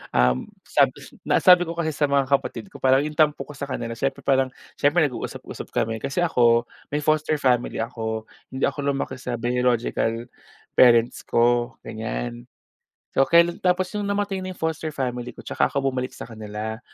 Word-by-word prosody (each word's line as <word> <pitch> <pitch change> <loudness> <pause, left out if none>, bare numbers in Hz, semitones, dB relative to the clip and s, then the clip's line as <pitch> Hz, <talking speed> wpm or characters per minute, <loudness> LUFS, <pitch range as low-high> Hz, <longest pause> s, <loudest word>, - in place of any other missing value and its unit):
um, 60 +1 +3 0.2
sabs - - +1
na - - +3
sabi 180 -1 +8
ko - - -3
kasi 165 -2 -1
sa 150 - -1
mga 140 -1 +2
kapatid 140 +7 0
ko - - -11
parang 130 0 +5
yung 155 - -7
tampo 150 -3 +2
ko 150 - -10
sa 140 - -7
kanila 115 -3 -4
siyempre 135 +3 -2
parang, 135 -1 +3 0.3
siyempre 150 +4 +4
nag-uusap-usap 125 - -7
kami. 110 0 -1
Kasi 135 - -2
ako, 120 -8 +4 0.3
may 150 - +1
foster 155 +1 +2
family 125 -3 +1
ako, 110 -2 -4 0.3
hindi 130 - -3
ako 140 -1 -1
lumaki 135 -1 -3
sa 125 -2 -5
biological 120 -1 0 0.5
parents 120 -1 +5
ko, 120 +1 +2
ganyan. - - -5 0.7
So 135 - +5
kailan 170 0 +4
tapos 180 0 +2
'yong 205 -1 -2
namatay 200 -1 -1
na 185 - -4
foster 160 -1 -2
family 125 -2 -3
ko, - - -14
'tsaka - - +1
ako 140 -1 0
bumalik 130 0 -3
sa - - -7
kanila. 110 0 -6
130 Hz, 175 wpm, -24 LUFS, 115-155 Hz, 0.7 s, sabi